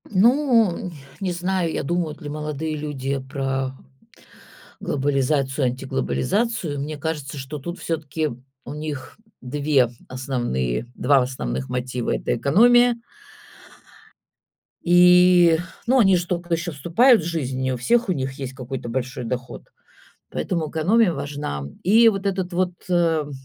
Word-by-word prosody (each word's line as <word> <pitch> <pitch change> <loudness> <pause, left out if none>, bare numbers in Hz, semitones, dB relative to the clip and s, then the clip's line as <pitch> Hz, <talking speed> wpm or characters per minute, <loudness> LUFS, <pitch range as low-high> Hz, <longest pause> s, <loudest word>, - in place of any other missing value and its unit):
Ну, 230 - +3
ня, 180 - -6 0.3
не 190 -3 -1
знаю, 180 -1 -1
я - - -2
думают 170 +1 -2
ли 150 - -6
молодые 150 +1 -4
люди 140 -2 -3
про 135 -1 -3 1.1
глобализацию, 140 -1 0
антиглобализацию. 140 - -1
Мне 150 +2 -4
кажется, 150 -3 -4
что 140 +2 -6
тут 175 +5 -6
всё-таки 160 -1 -2 0.4
у - - -6
них 150 -3 -6 0.2
2 140 -1 +1 0.2
основные 120 - -2
2 135 +1 +3
основных 65 - -3
мотива- 125 -1 -2
это - - -1
экономия 235 - +4 1.8
И, 180 -1 +6 0.3
ну, 260 +3 +3
они 195 -5 +5
же 175 - -2
тока 175 -1 -2
ещё 165 +1 -1
вступают 180 - +4
в - - -6
жизнь, 140 -7 -3
не 130 0 0
у - - -3
всех 235 - +1
у - - +3
них 135 -3 -3
есть 135 -2 -6
какой-то 130 -2 -6
большой 125 0 -3
доход, 125 +1 -6 0.6
поэтому 165 -4 -2
экономия 185 +5 +3
важна, 145 - -4
м. 70 0 -9
И 225 +5 +6
вот 200 -2 -1
этот 190 -2 -1
вот, 180 +1 0 0.2
эм, 165 -4 +1
150 Hz, 135 wpm, -22 LUFS, 130-180 Hz, 1.8 s, И